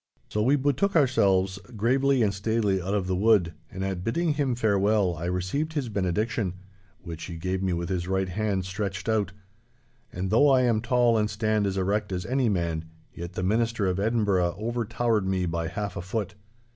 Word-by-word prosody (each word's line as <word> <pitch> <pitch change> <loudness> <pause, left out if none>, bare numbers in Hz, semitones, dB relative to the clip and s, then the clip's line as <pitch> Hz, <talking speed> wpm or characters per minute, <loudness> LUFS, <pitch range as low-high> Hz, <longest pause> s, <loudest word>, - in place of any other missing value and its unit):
So 105 - -1
we 130 +6 +4
betook 145 +8 +1
ourselves 100 - +3 0.2
gravely 130 +3 +2
and 100 -2 +1
staidly 100 -1 0
out 95 +4 -2
of 100 -3 0
the 95 0 -1
wood, 95 -4 +3 0.2
and 95 +1 -4
at 95 -2 -3
bidding 155 - 0
him 140 -4 0
farewell 100 -4 +2
I 80 +2 -5
received 95 - -2
his 140 -6 -2
benediction, 100 0 -1 0.5
which 85 -3 -7
he 85 - -7
gave 90 +3 -2
me 95 -2 0
with 85 0 -3
his 90 -2 -2
right 95 0 0
hand 95 0 -1
stretched 95 0 -4
out. 105 -4 +1 0.8
And 95 +1 -3
though 140 +7 +5
I 130 -2 +5
am 115 -3 +2
tall 120 -1 +3
and 105 0 +1
stand 105 -1 0
as 95 0 -2
erect 100 +2 0
as 90 -1 -3
any 130 -2 +1
man, 85 -4 -1 0.3
yet 85 +1 -7
the 90 - -3
Minister 115 +2 +1
of 95 0 0
Edinburgh 100 -5 +1
overtowered 115 -1 -1
me 95 -1 0
by 85 -1 -2
half 100 +2 -4
a - - -4
foot. 95 +2 -3
100 Hz, 190 wpm, -26 LUFS, 95-115 Hz, 0.8 s, though